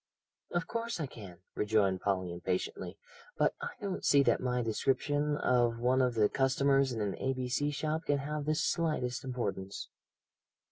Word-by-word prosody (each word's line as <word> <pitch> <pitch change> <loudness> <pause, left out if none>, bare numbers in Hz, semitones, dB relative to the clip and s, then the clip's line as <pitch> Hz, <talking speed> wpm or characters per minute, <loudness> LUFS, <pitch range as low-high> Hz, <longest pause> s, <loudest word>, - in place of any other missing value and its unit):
"Of 175 -1 -1
course 230 +1 -3
I 155 - -1
can," 100 -9 -11
rejoined 100 -3 +2
Polly 95 -3 0
impatiently, 90 +1 -3 0.4
"but - - +3
I - - -2
don't 195 -2 -4
see 140 -1 +5
that - - +2
my 125 -1 0
description 145 +6 0
of 120 -4 +2
one 125 +2 +2
of 125 -2 +1
the 105 -2 +4
customers 135 +1 +2
of 115 -3 -3
an 100 -2 -1
A.B.C. 130 +2 0
shop 155 +2 -2
can 145 - +2
have 150 +1 -3
the 155 +1 +1
slightest 150 -6 0
importance." 100 -7 -4
130 Hz, 155 wpm, -32 LUFS, 110-145 Hz, 0.4 s, see